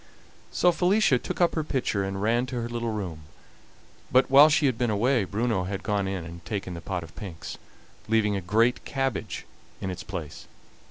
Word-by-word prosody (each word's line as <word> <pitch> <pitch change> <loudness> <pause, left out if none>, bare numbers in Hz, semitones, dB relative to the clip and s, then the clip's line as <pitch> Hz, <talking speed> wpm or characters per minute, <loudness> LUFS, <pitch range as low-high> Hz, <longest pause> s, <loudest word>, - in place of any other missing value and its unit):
So 180 - +4
Felicia 180 - +3
took - - -5
up 175 - +4
her 160 - -1
pitcher 125 -9 -1
and 95 0 -3
ran 120 +3 +2
to 125 - -5
her 115 - -3
little 120 0 -3
room, 90 -8 -5 0.9
but 130 +1 +4
while 145 +3 +9
she 150 0 +3
had 130 -3 +2
been 120 0 0
away 115 +2 +2
Bruno 105 -1 0
had 95 +1 -4
gone 100 -2 0
in 95 -3 -3
and 85 +1 -10
taken 95 0 -4
the 85 - -7
pot 90 +1 -3
of 80 - -13
pinks, 85 -6 -8 0.5
leaving 110 -2 +2
a 100 - -2
great 115 +7 +2
cabbage 135 -7 -3 0.3
in 95 - -3
its 90 - -6
place. 85 -6 -7
105 Hz, 195 wpm, -26 LUFS, 95-125 Hz, 0.9 s, while